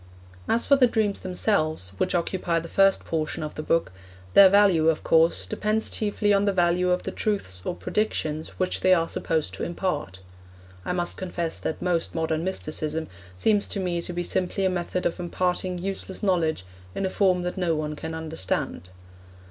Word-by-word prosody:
As 235 - +2
for 280 - +6
the 255 -2 +6
dreams 215 -3 0
themselves, 155 - 0
which - - +1
occupy 175 0 0
the 165 0 -3
first 195 +2 +3
portion 155 -1 -2
of 155 - -5
the - - -5
book, 165 - +1 0.4
their 195 -1 +9
value, 190 -5 +5
of 160 - 0
course, 160 - +3
depends 215 - -1
chiefly 205 -1 0
on 200 0 +3
the 200 - +3
value 180 0 +2
of 180 0 +1
the - - -4
truths 195 - -2
or - - -2
predictions 155 - -2
which 185 - -1
they 185 0 +5
are 165 -1 +1
supposed 155 - -1
to 95 - -5
impart. 170 - -3 0.7
I - - -1
must 175 -1 -2
confess 175 -3 -3
that 160 - -4
most 175 -2 0
modern 160 -1 -1
mysticism 160 - -3 0.3
seems 205 - +2
to 200 - -2
me 175 -2 -1
to 175 - -5
be 175 0 -2
simply 185 +2 -1
a 190 - +2
method 180 0 -2
of 175 - -1
imparting 180 +1 -1
useless 190 +1 -5
knowledge 165 - +1 0.3
in 195 - -1
a - - 0
form 185 -3 +2
that 180 - -3
no 175 -4 0
one 150 0 -3
can 160 +2 -6
understand. 155 - -3
175 Hz, 185 wpm, -25 LUFS, 160-190 Hz, 0.7 s, their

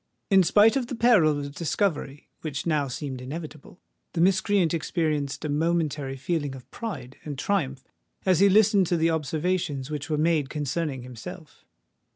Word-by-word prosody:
In 195 -1 +7
spite 205 +7 +5
of 260 -3 0
the 250 - -4
peril 200 -11 +4
of 140 0 -6
discovery 155 -3 -2
which 145 -3 -4
now 150 -4 +1
seemed 130 0 -5
inevitable, 155 +4 -8 0.3
the 165 - 0
miscreant 190 -1 +3
experienced 155 -4 -1
a - - 0
momentary 150 -3 0
feeling 145 -1 -2
of 130 - -12
pride 155 - -6
and 145 -3 -6
triumph 145 -6 -1 0.4
as 185 -3 +4
he 200 +1 +6
listened 200 -2 +5
to 175 - +1
the 165 +1 +2
observations 155 -2 -1
which 145 0 -4
were 155 - 0
made 155 -3 +1
concerning 145 -2 -3
himself. 125 -3 -10
155 Hz, 160 wpm, -26 LUFS, 140-185 Hz, 0.4 s, In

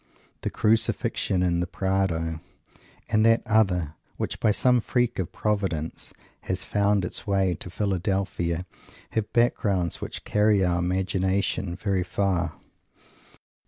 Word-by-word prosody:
The - - -1
Crucifixion 105 -3 +1
in 85 -1 +1
the 90 - -1
Prado, 90 -4 -1 0.7
and 110 -1 +3
that 115 0 +4
other, 95 -8 +2 0.2
which, - - -3
by - - +3
some 125 +3 +3
freak 120 -2 0
of 90 - -2
Providence, 95 -7 -2 0.3
has 95 0 -3
found 100 -2 +1
its 90 - -5
way 95 -2 +2
to - - -6
Philadelphia, 95 -3 -1 0.5
have 110 -2 -2
backgrounds 100 -7 +1
which - - -6
carry 105 -2 +3
our 90 0 +1
imagination 95 0 0
very 95 -1 0
far. 90 -1 0
95 Hz, 125 wpm, -26 LUFS, 90-105 Hz, 0.7 s, that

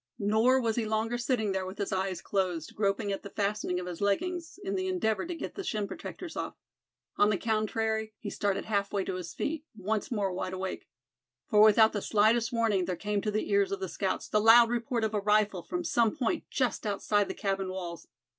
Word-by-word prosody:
Nor 220 +5 +3
was 230 -2 0
he 230 - +1
longer 220 +2 -1
sitting 240 -4 0
there 190 -1 -2
with 190 +1 -8
his 200 0 -2
eyes 190 -1 -2
closed, 180 -5 -1
groping 200 0 0
at 195 - -3
the 200 - -8
fastening 200 -3 -1
of 180 - -5
his 180 0 -6
leggings 335 - -1
in 390 0 -2
the 375 -1 -1
endeavor 220 - 0
to 350 - -4
get - - -6
the 390 - -5
shin 215 - -2
protectors 335 - -7
off. - - -4 0.6
On 205 - +5
the 210 - +2
contrary 220 0 -1
he 205 - -6
started 200 -2 -1
half 200 -2 0
way 200 -2 0
to - - -3
his 180 -2 -6
feet, 310 +1 -2
once 210 +1 -2
more 200 -5 -1
wide 185 0 -3
awake. 185 0 -5 0.6
For 210 -1 +6
without 220 +1 +7
the 205 - -2
slightest 220 +3 +3
warning 225 -6 +1
there 180 0 -2
came 205 +3 -1
to 210 - -1
the 215 +1 -2
ears 400 -1 +3
of 400 - -2
the 385 - -3
scouts - - -2
the 210 - +2
loud 230 +1 +7
report 235 0 -1
of 220 0 0
a 210 - +1
rifle 210 -2 +2
from 350 - -4
some 235 -9 +2
point 285 +5 -1
just 250 -4 -1
outside 205 0 +1
the - - -5
cabin 195 -2 -1
walls. 175 -3 -6
215 Hz, 220 wpm, -29 LUFS, 195-235 Hz, 0.6 s, without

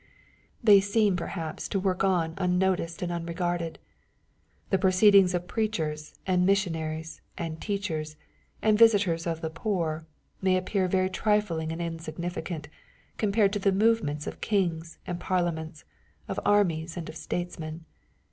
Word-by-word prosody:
They 205 -3 +8
seem 205 0 +2
perhaps 170 -2 -4
to 195 - 0
work 185 -1 0
on 175 -4 +2
unnoticed 180 -2 0
and 175 - -2
unregarded. 170 0 -2 0.9
The 190 - +3
proceedings 190 0 +5
of 175 0 -3
preachers, 160 -9 -2
and 180 -1 +2
missionaries, 160 -5 -1 0.2
and 160 -2 -5
teachers, 165 -7 -3 0.5
and 215 -1 +4
visitors 200 -7 +4
of 165 -1 -2
the 160 - -3
poor, 165 -3 -2 0.3
may 190 -1 +3
appear 185 +1 0
very 185 0 +1
trifling 185 -7 0
and 165 - -5
insignificant, 165 -1 -5 0.5
compared 205 -1 +2
to 205 - 0
the 195 0 +3
movements 195 -8 +1
of - - -7
kings 170 -5 -1
and 175 -1 -4
parliaments, 165 -4 -2 0.4
of - - -2
armies 170 -5 +2
and 170 - -5
of - - -8
statesmen. 160 0 -5
175 Hz, 135 wpm, -28 LUFS, 165-195 Hz, 0.9 s, They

